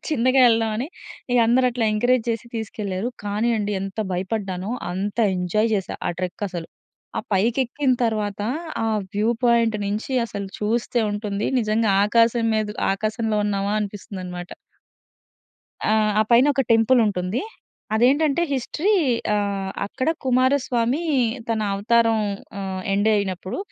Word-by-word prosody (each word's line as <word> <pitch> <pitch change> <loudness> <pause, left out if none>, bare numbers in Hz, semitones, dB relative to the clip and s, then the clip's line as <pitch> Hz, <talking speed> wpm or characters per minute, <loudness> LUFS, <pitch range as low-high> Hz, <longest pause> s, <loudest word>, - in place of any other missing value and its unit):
చిన్నగా 255 -2 +3
ఎళ్దాం 225 -1 +1
అని 260 +7 -3 0.4
ఇగ 245 - +4
అందరూ 250 +2 +4
అట్లా 240 -1 -1
ఎంకరేజ్ 245 +2 +2
చేసి 230 +1 -3
తీసుకెళ్లారు. 210 -1 -3 0.2
కానీ 210 +4 0
అండి, 205 0 -2
ఎంత 195 +2 -6
భయపడ్డానో 190 0 -3 0.2
అంత 200 +4 -3 0.2
ఎంజాయ్ 195 +5 +1
చేశా 195 -2 -3
ఆ - - +1
ట్రెక్ 185 +3 -3
అసలు. 175 -3 -6 0.5
ఆ - - +1
పైకెక్కిన 250 +6 +1
తర్వాత 210 -3 -1 0.4
ఆ - - 0 0.3
వ్యూ 210 +3 +2
పాయింట్ 230 -2 +3
నుంచి 210 +6 -3
అసలు 200 -2 -5
చూస్తే 230 +3 0
ఉంటుంది. 205 -1 -2
నిజంగా 215 0 +1 0.2
ఆకాశం 230 +2 +3
మీద 215 -1 0 0.3
ఆకాశంలో 215 +1 -1
ఉన్నామా 200 0 -1
అనిపిస్తుందన్నమాట. 185 -3 -6 1.4
ఆ! - - +4 0.3
ఆ - - +6
పైన 240 +3 +6
ఒక 270 - +2
టెంపుల్ 225 +3 +4
ఉంటుంది. 185 +2 -1 0.5
అదేంటంటే, 280 +7 +3
హిస్టరీ. 310 - 0 0.4
ఆహ్, 200 -2 -1 0.2
అక్కడ 260 +7 -3 0.2
కుమారస్వామి 255 +1 +2 0.5
తన 225 -1 0
అవతారం 225 +2 +3 0.4
ఆహ్, 190 -1 -4
ఎండ్ 205 +2 +2
అయినప్పుడు 190 -2 -2
215 Hz, 130 wpm, -23 LUFS, 200-240 Hz, 1.4 s, ఆ